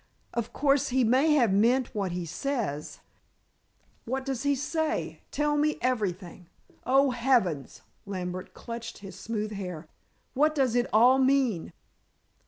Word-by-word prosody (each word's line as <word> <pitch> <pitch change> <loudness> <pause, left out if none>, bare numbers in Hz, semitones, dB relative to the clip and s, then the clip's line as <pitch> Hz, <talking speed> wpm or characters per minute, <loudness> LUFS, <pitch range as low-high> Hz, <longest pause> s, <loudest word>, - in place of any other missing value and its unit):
Of 235 -1 -3
course, 280 0 +2
he 260 0 +2
may 265 +7 +4
have 240 -9 +3
meant 240 +5 +2
what 200 -4 -2
he 175 0 -3
says 195 - -3 0.5
" - - -40
"What 260 +3 -3
does 270 -3 -3
he 285 0 +2
say? 315 +3 -2
Tell 295 0 0
me 300 +1 +1
everything. 190 -8 -2 0.4
Oh, 270 +1 +4
heavens!" 235 - 0 0.2
Lambert 185 -2 -5
clutched 230 0 -7
his 195 - -9
smooth 215 -1 -4
hair. 180 -6 -6 0.5
"What 305 +3 +2
does 265 -5 +2
it 245 0 +2
all 245 +5 +6
mean?" 260 -9 +2
240 Hz, 140 wpm, -28 LUFS, 195-270 Hz, 0.5 s, all